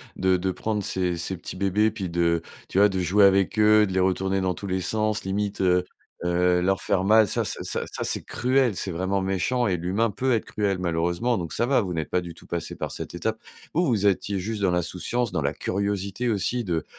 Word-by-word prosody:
de 95 -1 +2
de 95 +1 -1
prendre 105 +1 -2
ces 90 -3 -1
ces 90 +3 -3
petits 85 - -8
bébés, 100 +3 +2
puis 100 -5 -5
de 85 -1 +1 0.3
tu - - -3
vois 105 +1 +6
de 95 - -2
jouer 95 +3 +4
avec 100 +3 +3
eux, 105 -1 +5
de - - -5
les 95 - +1
retourner 95 +1 +1
dans 95 -1 0
tous 100 +4 -7
les 95 0 -1
sens, 110 +2 0
limite, 100 +1 -2
heu 90 -1 +3 0.4
heu, 90 0 +2
leur 95 0 +1
faire 95 -1 +1
mal. 110 +1 +5
Ça - - 0
ça - - -3
ça - - -2
ça - - -4
c'est - - -1
cruel, 125 -3 +1
c'est 95 - -3
vraiment 95 +3 -1
méchant 95 +6 0
et 95 - +1
l'humain 95 +7 0
peut 130 +6 -1
être 115 - 0
cruel 100 -2 -1
malheureusement, 85 +7 0
donc 85 -2 -4
ça 120 - 0
va, 130 -2 +3
vous 90 -3 -3
n'êtes 80 -2 -3
pas 90 - +1
du 85 -1 -8
tout - - -16
passés 85 -1 -4
par - - -4
cette - - -6
étape. 110 +6 -2 0.4
Vous, 175 +3 +2
vous 105 - +2
étiez 100 0 0
juste 105 +3 -4
dans 95 -2 +2
l'insouciance, 90 +7 -1
dans - - 0
la 70 +1 0
curiosité 100 +6 -2
aussi 115 +4 0
de 85 -6 -2
95 Hz, 235 wpm, -25 LUFS, 90-105 Hz, 0.4 s, vois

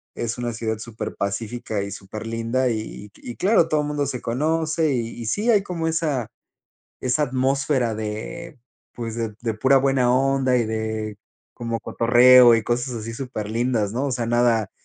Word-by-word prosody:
es 115 0 -3
una 120 -1 -2
ciudad 110 -1 -3
súper 115 0 -6
pacífica 105 +1 -3
y 100 - -6
súper 100 +3 -8
linda 115 +3 0
y 110 -2 -5
y 120 - -9
claro, 190 -4 +3
todo 155 -1 +2
el 145 - -3
mundo 145 -1 -1
se 125 -2 -4
conoce 155 +5 0
y 115 -3 -1
y - - -5
sí, 210 - 0
hay 210 -3 +4
como 170 -4 -3
esa 155 -7 -1 0.7
esa 130 +4 +1
atmósfera 130 -2 +1
de 110 +10 -6 0.4
pues 115 -2 -5
de 115 -2 -3
de 115 -2 -1
pura 130 +6 +3
buena 130 -2 +2
onda 135 -1 +2
y 120 - +2
de 110 -1 -3 0.4
como 115 -1 -3
cotorreo 120 +1 +6
y 115 - +1
cosas 120 +3 -1
así 115 0 -5
súper 115 -5 -5
lindas, 115 -3 0
¿no?, 130 +5 -1
o 135 - -2
sea, 120 -2 -2
nada 115 -3 +2
120 Hz, 180 wpm, -23 LUFS, 110-135 Hz, 0.7 s, cotorreo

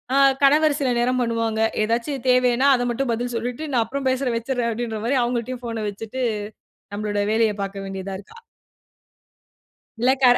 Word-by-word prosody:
அ - - +4 0.3
கணவர் 295 +1 +5
சில 265 - +1
நேரம் 255 +1 +1
பண்ணுவாங்க. 230 -2 0 0.2
ஏதாச்சும் 235 +4 -2
தேவையின்னா 250 +1 +4
அத 245 - -1
மட்டும் 240 +1 -1
பதில் 245 +2 -3
சொல்லிட்டு, 245 +5 -4
"நான் 240 -3 +3
அப்புறம் 270 +3 -3
பேசுறேன், 260 -2 0
வச்சுறேன்" 240 0 -1
அப்பிடின்றமாரி 230 +2 -1
அவங்கள்ட்டயும் 245 +1 -3
ஃபோன 230 -2 -3
வச்சுட்டு 225 +5 -6 0.7
நம்மளோட 205 0 -2
வேலைய 220 -1 +3
பார்க்க 195 0 -6
வேண்டியதா 195 0 -5
இருக்கு 205 - -14 1.6
இல்ல 250 +3 +4
கர 245 -1 +7
240 Hz, 150 wpm, -23 LUFS, 225-255 Hz, 1.6 s, கர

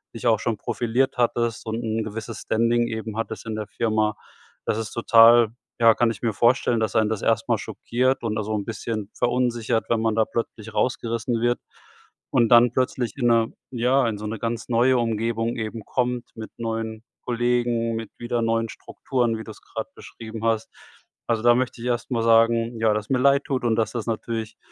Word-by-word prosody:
dich 115 - -7
auch 110 -3 +4
schon 115 -2 -1
profiliert 120 +4 -1
hattest 115 -1 0
und 115 +2 -3
'n 110 0 -1
gewisses 110 +1 -6
Standing 115 +1 +1
eben 110 -1 -5
hattest 115 0 -4
in 110 -1 -4
der 105 -2 -4
Firma. 110 -2 0 0.5
Das 105 - 0
ist 110 -2 -5
total, 115 -1 +6 0.3
ja, 115 -1 +6
kann 120 -1 +2
ich 105 - -8
mir 115 -3 0
vorstellen, 120 +1 +2
dass 110 -1 -1
einen 110 -1 +3
das 110 -3 -3
erst - - +1
mal - - +3
schockiert 130 +2 -1
und 110 -2 -2
da 110 - -1
so 110 +1 -3
'n 105 - -1
bisschen 110 -2 -4
verunsichert, 120 -2 0
wenn 115 -1 +2
man 115 -1 +1
da 110 - +4
plötzlich 110 -1 -5
rausgerissen 115 -1 -1
wird. 120 +1 +1 0.7
Und 115 -1 +3
dann 120 0 +7
plötzlich 130 0 -1
in 125 - -1
'ner 115 -1 +4 0.2
ja, 125 +1 +2
in 110 -2 -2
so 105 - -5
'ne 110 +1 -4
ganz 115 0 -3
neue 125 +2 +3
Umgebung 115 0 -1
eben 110 -1 -4
kommt 125 -1 -1
mit 110 -1 -8
neuen 110 -1 -4 0.2
Kollegen, 120 -1 0
mit 115 -1 -5
wieder 120 0 -1
neuen 115 0 0
Strukturen, 120 -2 -2
wie - - -6
du's 110 -2 -11
grade - - -6
beschrieben 110 0 -8
hast. 115 -1 0 0.6
Also, 115 -1 0
da 120 0 +6
möchte 130 -1 -1
ich 125 - -4
erst 120 +1 -2
mal 115 -2 0
sagen, 115 0 +3
ja, 110 -1 +4
dass 105 0 -3
mir 130 - +2
leid 140 +2 +4
tut 130 -3 -2
und 115 -2 +2
dass 110 0 0
das 115 -3 -3
natürlich 115 -1 -4
115 Hz, 200 wpm, -24 LUFS, 110-120 Hz, 0.7 s, dann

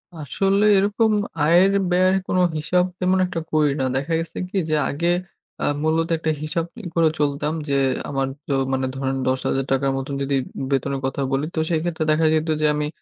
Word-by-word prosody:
আসলে 195 +7 +1
এরকম 210 +3 +2 0.3
আয়ের, 175 +5 +5 0.2
ব্যয়ের 185 +1 +3
কোন - - 0 0.2
হিসাব 180 +4 +1
তেমন 185 +1 +2
একটা 180 -2 -3
করি 150 -2 +3
না। 130 - +1
দেখা 140 +5 -1
গেছে 165 0 -6
কি? 195 - -3
যে, 155 - +2
আগে 170 +5 -1 0.5
এ্যাঁ - - 0
মূলত 160 +1 +1
একটা 160 0 -1
হিসাব 165 +2 -1 0.2
ই - - -3
করে 165 -2 +4
চলতাম 150 +1 0 0.2
যে, 140 - +1 0.3
আমার 135 -1 -1 0.2
তো 140 - -1 0.2
মানে 130 0 0
ধরেন 135 0 -2
৳১০,০০০ 135 +1 0
র - - +2
মতো 135 +1 -5
যদি 140 0 0 0.4
বেতনের 135 0 0
কথা 135 +1 -2
বলি, 135 +2 0
তো - - 0
সেক্ষেত্রে 165 -1 -1
দেখা 155 +1 +2
যেত 160 +1 +1
যে - - +3
আমি 150 0 -1
155 Hz, 185 wpm, -22 LUFS, 140-175 Hz, 0.5 s, আয়ের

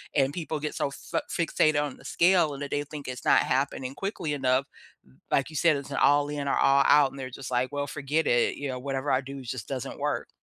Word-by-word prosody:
And 135 -1 +2
people 160 -2 -3
get 150 - -3
so 140 - -1
fa - - -4
fixated 155 -2 +2
on 145 -3 -5
the - - -17
scale 170 -4 +3
and 140 - -6
that 140 - -6
they 145 - 0
think 150 -1 -8
it's 125 -1 -7
not - - +5
happening 135 0 -1
quickly 190 -6 -3
enough. 130 -1 +1 0.7
Like 140 - +2
you 155 - -6
said, 165 +1 +4
it's 140 0 -8
an 135 - -3
all-in 145 0 +2
or 140 - +2
all-out, 140 0 +5
and 135 - -10
they're 130 -1 -5
just 130 0 -8
like, 125 +1 0
"Well, 145 0 -2
forget 145 +4 -1
it," 120 0 +2
you 140 -1 -4
know, 125 -1 -4
"whatever 135 +1 -2
I 130 - +3
do 135 0 -8
just 125 -2 -6
doesn't 130 -3 -5
work." - - -2
140 Hz, 235 wpm, -27 LUFS, 135-150 Hz, 0.7 s, not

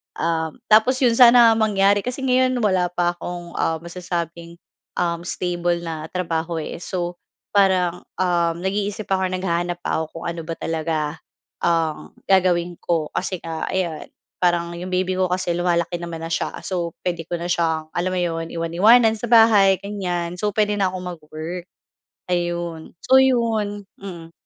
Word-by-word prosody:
Um, 160 +1 -2
tapos 220 +5 +5
'yon 240 -3 +4
sana 235 -1 +8
mangyari 205 -2 +3
kasi 250 +2 -3
ngayon 255 0 +3
wala 185 -5 +1
pa 175 0 +1
akong, 175 0 -7
um, 165 - 0
masasabing, 170 -1 -5 0.4
um, 170 -1 -1
stable 175 -1 -1
na 160 -2 -5
trabaho 165 -2 -2
eh. - - -6
So 175 0 -4 0.4
parang, 185 -3 +3 0.2
um, 170 -2 +1
nag-iisip 200 +2 -2
ako 190 -1 +1
or - - -6
naghahanap 175 -1 -1
pa - - 0
ako 160 +1 -6
kung - - -7
ano 170 0 -5
ba 165 - -3
talaga 160 0 -2 0.7
ang 165 -2 0
gagawin 180 -2 +3
ko. 165 -3 -1
Kasi 185 -1 -2
nga 165 -1 -4
ayan 175 -4 -2 0.3
parang 175 -1 +1
'yong 180 +2 -6
baby 185 0 0
ko 185 0 +2
kasi 180 -1 0
lumalaki 175 0 0
naman 170 -1 -6
na 165 - -4
siya. - - -1
So 175 -3 -3
puwede 170 -2 -2
ko 175 - -2
na 170 - -4
siyang 160 -2 0
alam 180 +1 0
mo - - 0
'yon, 165 -1 -2
iwan-iwanan 210 +8 +4
sa 240 - -4
bahay 215 -4 +7
ganyan. 180 -4 -3
So 210 +2 0
puwede 210 -1 +2
na 195 - +3
kong 185 -1 -5
mag-work. 160 +3 -7 0.7
Ayon. 175 -2 -2
So 260 +1 +6
'yon, 225 -5 +1 0.2
hmm. 170 -4 -9
175 Hz, 160 wpm, -22 LUFS, 170-195 Hz, 0.7 s, sana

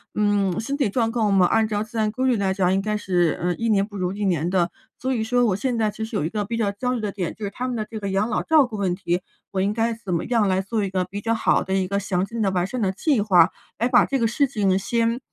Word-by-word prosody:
嗯， 205 -3 +1
身 250 +6 -2
体 275 -7 +1
状 225 +1 0
况 225 -3 +1
嘛， 190 -2 +5
按 220 +4 +2
照 210 -1 -1
自 225 +1 -9
然 215 -1 +1
规 255 +4 -1
律 245 - +3
来 195 -2 0
讲， 190 -1 +1
应 195 - +1
该 210 +1 -1
是， 175 -5 +1
呃， 175 0 0
一 230 - -2
年 200 -2 +3
不 205 -1 -9
如 185 0 -1
一 205 - -4
年 175 -3 +1
的。 175 -2 +1 0.3
所 260 +1 -1
以 225 - -1
说 245 +2 +2
我 195 - +1
现 240 +4 -1
在 220 -1 +1
其 220 - -6
实 225 - -7
有 205 - 0
一 - - -1
个 210 +2 -2
比 230 +3 -3
较 210 -3 +1
焦 250 +5 -2
虑 245 - -2
的 210 -2 -2
点， 185 -5 -3
就 220 - -10
是 200 - -4
他 250 +5 -4
们 250 - -3
的 215 -2 -2
这 220 - -6
个 200 - -3
养 195 +4 0
老 - - 0
照 310 -3 +5
顾 235 -3 -7
问 190 -3 0
题， 180 -1 -1 0.3
我 195 - -2
应 200 +2 +1
该 230 +1 0
怎 210 -5 -5
么 165 - 0
样 230 -4 +2
来 190 0 +1
做 210 +2 -2
一 - - -3
个 185 -1 0
比 200 +3 -6
较 230 +2 0
好 225 - +2
的 190 - -3
一 190 -1 +1
个 200 +1 0
详 185 -2 -1
尽 230 +2 -5
的、 195 - +2
完 180 -1 0
善 250 +3 -4
的 190 -3 +1
计 260 - +1
划， 200 -4 +5 0.3
来 235 - +1
把 245 -1 +5
这 275 - -1
个 230 - +2
事 280 +5 +2
情 200 -7 +1
先 230 +4 0
210 Hz, 335 characters per minute, -23 LUFS, 190-230 Hz, 0.3 s, 嘛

